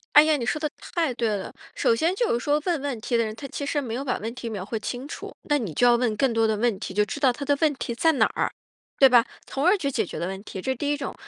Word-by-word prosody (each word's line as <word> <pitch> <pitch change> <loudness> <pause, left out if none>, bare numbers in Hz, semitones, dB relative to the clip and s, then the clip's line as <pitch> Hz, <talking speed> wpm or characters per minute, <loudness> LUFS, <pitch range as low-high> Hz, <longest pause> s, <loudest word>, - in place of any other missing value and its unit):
哎 295 +1 +10
呀， 310 -1 +3
你 240 - -3
说 300 +7 -1
的 305 -2 -1
太 325 -7 -2
对 235 -1 0
了！ 190 - -6 0.2
首 230 - +2
先 330 +8 +1
就 470 +4 +1
是 - - +1
说 295 +1 +2
问 340 -5 +1
问 275 -6 -3
题 240 +2 0
的 230 - +2
人， 215 0 -4
他 275 +4 -8
其 285 - -5
实 290 +1 0
没 235 -4 -4
有 270 - -3
把 255 - -1
问 225 +2 -4
题 240 -2 -6
描 205 -4 -4
绘 220 +3 -3
清 250 +5 -5
楚。 - - -7
那 295 - +3
你 205 - -4
就 245 - +3
要 240 0 +6
问 235 -3 0
更 260 -4 +2
多 225 0 +3
的 220 - +1
问 235 -3 +1
题， 190 - -6
就 210 +2 +3
知 210 +7 -3
道 265 -3 +4
他 280 +2 -6
的 285 -1 +3
问 300 -2 +4
题 235 -2 -4
在 320 +7 +3
哪 275 - +3
儿， - - -2 0.5
对 270 - +8
吧， 240 -2 +6 0.2
从 275 - -3
而 375 +4 +6
去 280 -6 -1
解 230 -5 0
决 - - -7
了 170 - -2
问 195 +2 -6
题， 190 - -6
这 265 - -1
是 - - -5
第 290 +4 -1
一 290 - -2
种。 275 - -5
250 Hz, 345 characters per minute, -25 LUFS, 225-290 Hz, 0.5 s, 哎